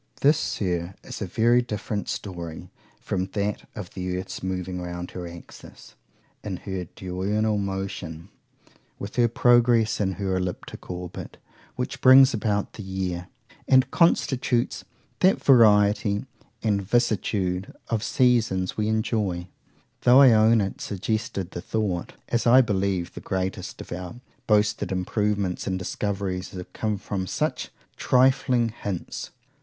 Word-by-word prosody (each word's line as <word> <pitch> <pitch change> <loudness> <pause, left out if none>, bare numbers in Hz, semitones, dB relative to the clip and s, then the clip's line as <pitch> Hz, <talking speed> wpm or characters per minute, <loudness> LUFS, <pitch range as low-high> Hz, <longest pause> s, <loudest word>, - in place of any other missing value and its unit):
This, 145 +2 +5
Sir, 90 -1 -2
is - - -8
a 100 - -2
very 120 +6 +3
different 105 -3 -4
story 85 -5 -6 0.3
from 95 0 -2
that 105 0 -2
of 105 -5 -7
the 90 -1 -3
earth's 95 +1 -6
moving 90 -1 -3
round 90 0 -6
her 90 -1 -6
axis, 85 0 -13 0.5
in 100 -4 -4
her 95 -3 -5
diurnal 100 +4 -1
rotation, 95 -3 -5 0.7
with 100 - -7
her 120 -1 +5
progress 120 -2 +3
in 95 -2 0
her 95 +1 -2
elliptick 90 -1 -5
orbit 90 -1 -7 0.4
which 125 - -4
brings 130 +1 +8
about 105 -2 -1
the - - -8
year, 95 -2 -4 0.4
and 130 0 +4
constitutes 130 -7 +1 0.4
that 190 +1 +3
variety 105 -4 +4 0.4
and 105 -3 +1
vicissitude 100 -4 0 0.2
of 115 -2 0
seasons 115 -7 +2
we 105 -1 -1
enjoy;—though 110 +3 0
I 135 -3 +8
own 110 0 +5
it 95 -1 -4
suggested 105 -1 -3
the 85 - -6
thought,—as 110 +3 -2
I 125 +3 +8
believe 95 -6 -1
the - - -8
greatest 95 0 -3
of - - -12
our 90 +5 -6 0.3
boasted 105 -1 +2
improvements 100 0 -1
and 95 -1 0
discoveries 95 -1 -3
have 90 -1 -8
come 110 -2 -1
from 95 -1 -4
such - - -2 0.3
trifling 125 -2 +3
hints. 100 -5 -5
100 Hz, 130 wpm, -25 LUFS, 90-115 Hz, 0.7 s, brings